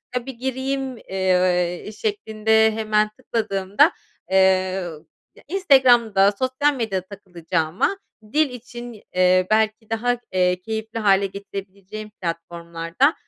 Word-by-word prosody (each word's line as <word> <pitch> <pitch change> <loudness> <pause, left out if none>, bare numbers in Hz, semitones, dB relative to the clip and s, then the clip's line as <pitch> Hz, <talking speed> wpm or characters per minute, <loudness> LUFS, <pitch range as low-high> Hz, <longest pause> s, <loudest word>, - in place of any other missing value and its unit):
"ya, 245 -1 -2
bir 265 - -6
gireyim," 265 +1 -3
eee, 180 -2 0
şeklinde 220 - +2
hemen 215 -1 +1
tıkladığımda, 210 - +1 0.4
eee, 190 - +4 1.0
ya - - -18
Instagram'da 245 - +4
sosyal 260 +3 +1
medyada 205 -7 -2
takılacağıma 175 - -2 0.4
dil 310 -1 +3
için, 240 -2 -9
eee, 185 0 +4
belki 220 0 +1
daha, 245 +2 0
eee, 180 -1 +1
keyifli 220 +2 -4
hâle 200 -2 +3
getirebileceğim 200 +1 -8
platformlarda, 170 - -1
215 Hz, 105 wpm, -22 LUFS, 185-245 Hz, 1.0 s, eee